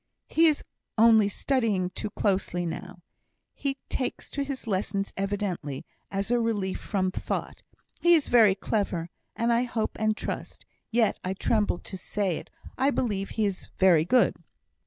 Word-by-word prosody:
"He 330 +1 +5
is 305 -2 +2 0.3
only 220 -2 +6
studying 205 -5 0
too 210 - -4
closely 190 -4 0
now; 180 +1 -6 0.5
he 275 -1 -2
takes 255 - -3
to 280 - -1
his 275 -2 -5
lessons 195 -1 -1
evidently 195 -8 -3 0.2
as 195 +3 -2
a 245 - +4
relief 210 -5 -1
from 185 -2 -1
thought. - - -4 0.4
He 345 0 +6
is 310 - +1
very 220 -5 +6
clever, 190 -5 -2 0.2
and 235 +1 +2
I 235 - +3
hope 225 -3 -2
and 215 0 +1
trust, - - -5 0.2
yet 230 -3 +2
I 185 +1 -2
tremble 210 -1 +1
to 190 - -8
say 190 -2 -1
it, - - -9 0.3
I 270 - +4
believe 205 -8 -1
he 220 - +3
is 195 -2 -3
very 180 -5 +5
good." 245 +9 +4
205 Hz, 155 wpm, -27 LUFS, 190-235 Hz, 0.5 s, only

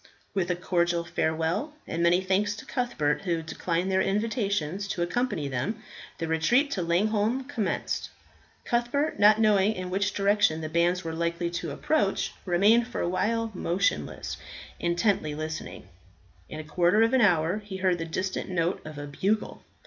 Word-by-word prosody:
With 185 -3 0
a 180 - +1
cordial 175 -1 0
farewell 165 - -1
and 165 - -3
many 170 +2 +4
thanks 195 +2 +1
to - - -10
Cuthbert, 240 - -1
who 170 -4 -1
declined 170 +3 -2
their 190 0 +3
invitations 200 - -1
to 175 -3 -1
accompany 180 - -1
them, 185 - -3 0.3
the 165 - -3
retreat 240 - +2
to 190 - -1
Langholm 210 +8 +1
commenced. 235 -8 -2 0.6
Cuthbert, 240 +6 0
not 210 +1 +6
knowing 210 -1 +4
in 185 -2 -5
which 195 +1 0
direction 200 -5 +2
the 155 - -4
bands 175 +3 +1
were 165 -1 -4
likely 170 +1 -1
to 170 -1 -3
approach, 200 - 0
remained 205 +6 +4
for 245 - -4
a - - 0
while 225 +5 0
motionless, 180 +1 -1 0.4
intently 170 -3 +1
listening. 155 - -6 0.6
In 155 - -6
a - - -5
quarter 175 +7 +3
of 230 +2 +2
an 260 - +4
hour 180 -1 +3
he 205 -2 -7
heard 185 -2 +1
the 165 - -3
distant 185 +5 -3
note 175 0 0
of 155 -1 -9
a 145 - -5
bugle. 195 +9 -1
185 Hz, 165 wpm, -27 LUFS, 170-210 Hz, 0.6 s, not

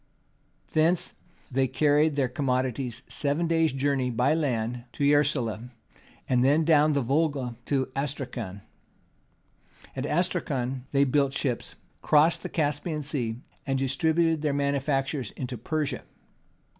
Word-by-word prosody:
Thence 165 +3 +2 0.4
they 130 +1 +2
carried 150 +3 +3
their 135 -3 +2
commodities 130 -1 -2
seven 145 +4 0
days' 165 -2 +2
journey 135 -1 0
by 125 +5 +2
land 125 -6 -1
to 145 - -3
Yeraslau, 125 -5 +2 0.6
and 125 -1 +3
then 150 +4 +4
down 155 -1 +5
the 140 -2 +1
Volga 135 -2 0
to 135 -2 +1
Astracan. 130 -8 -4 1.3
At 130 0 -3
Astracan 135 -7 -1
they 140 0 +4
built 140 0 +2
ships, 130 -3 -2 0.3
crossed 155 +3 +4
the - - -5
Caspian 150 0 -1
Sea, 125 -5 -3 0.3
and 135 -1 +1
distributed 160 +4 +1
their 150 -2 0
manufactures 140 -2 0
into 125 -1 -4
Persia. 150 +6 -2
140 Hz, 120 wpm, -27 LUFS, 125-150 Hz, 1.3 s, down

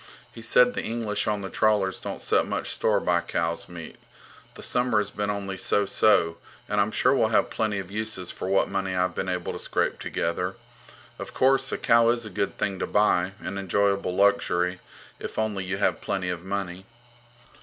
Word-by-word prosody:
He 115 - -11
said 125 +2 +4
the - - -2
English 110 -2 -2
on 105 -1 0
the 95 - -5
trawlers 105 -3 +2
don't - - -6
set - - +2
much - - -2
store - - +1
by - - +1
cow's 85 +1 -2
meat. 85 -2 -9 0.6
The - - -7
summer 125 -2 +2
has 105 -1 0
been 105 0 -2
only 100 -2 -3
so 105 - +2
so, 85 -5 +3 0.3
and 105 0 +1
I'm 100 - +1
sure 125 +4 +3
we'll 120 -5 +3
have 110 - +2
plenty 110 -2 -1
of 95 -1 -6
uses 105 -4 -3
for - - -6
what 95 0 +3
money 95 -1 -2
I've 90 -1 +1
been 95 - -3
able 90 -1 -2
to - - -6
scrape - - -1
together. 90 +3 -2 0.6
Of - - -8
course, 135 +1 +3
a - - -1
cow 115 0 +4
is 120 -1 +1
a 105 - -8
good 100 +2 -2
thing 95 -2 -2
to - - -2
buy, 95 -3 +2
an 100 - -4
enjoyable 100 -1 +1
luxury, 90 -2 +2 0.4
if - - -7
only 105 -3 -1
you 95 +1 -2
have 100 - +1
plenty 95 -2 -2
of 90 -2 -3
money. 95 -1 -4
100 Hz, 195 wpm, -26 LUFS, 90-110 Hz, 0.6 s, said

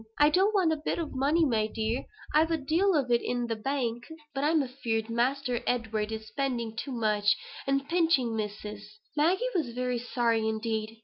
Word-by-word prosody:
I 295 +1 +5
don't 390 +6 +3
want 355 -5 +4
a - - -2
bit 300 - -2
for 335 - -1
money, 290 +4 +2
my 220 -6 +1
dear; 220 +3 -2 0.3
I've 315 +2 +4
a 330 - +1
deal 330 +7 +2
in 245 -3 +1
the 230 -1 -2
Bank. 240 0 -2 0.3
But 275 0 -2
I'm 310 0 +3
afeard 230 -4 -2
Master 250 +1 0
Edward 220 -3 -1
is 220 0 -5
spending 235 -1 -2
too 270 +4 -4
much, 210 -4 +2 0.3
and 275 0 +1
pinching 325 -9 +2
Missus." 210 0 -6 0.2
Maggie 345 +10 +2
was 305 -11 -1
very 250 -1 -1
sorry 235 -2 +1
indeed. 220 0 -2
245 Hz, 175 wpm, -29 LUFS, 225-295 Hz, 0.3 s, I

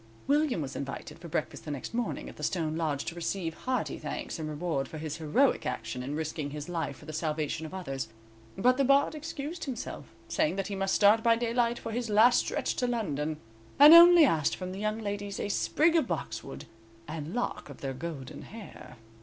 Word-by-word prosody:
William 285 - +2
was 135 -1 -6
invited 135 +3 -6
for 170 - -9
breakfast 155 -2 -3
the - - -8
next 145 - -5
morning 240 -1 -2
at - - -10
the - - -11
stone 160 -4 -1
lodge 155 -4 -1
to - - -4
receive 170 0 -3
hearty 255 +8 -2
thanks - - -5
and 155 -1 -4
reward 150 -3 -2
for 155 - -8
his 155 0 -5
heroic 170 - +2
action 115 +3 -4
in 140 +4 -4
risking 155 -1 -3
his 145 0 -6
life 165 -5 -3
for - - -14
the 155 - -7
salvation 155 0 -2
of 155 - -12
others; 135 -8 -4 0.5
but 250 +6 +3
the 275 - +3
Bard 275 +3 +4
excused 310 +1 -5
himself, 255 -5 -5 0.2
saying 310 -9 +1
that 195 0 -3
he 200 - -3
must 195 0 0
start 210 +2 +5
by 230 0 +4
daylight 235 0 0
for 225 - -6
his 235 0 -3
last 220 +4 +6
stretch - - -1
to 250 - +1
London, 155 - -2 0.4
and 295 +3 +10
only 340 -1 +10
asked 160 - +1
from 185 -1 -6
the 190 - -6
young 215 +1 -1
ladies 205 -2 -4
a 205 - -2
sprig 320 +10 +2
of 325 - +3
boxwood - - -5 0.4
and 160 +3 -5
lock 245 -9 -3
of 140 - -11
their 135 -1 -3
golden 140 -2 -7
hair. 220 -1 -11
185 Hz, 205 wpm, -29 LUFS, 155-240 Hz, 0.5 s, and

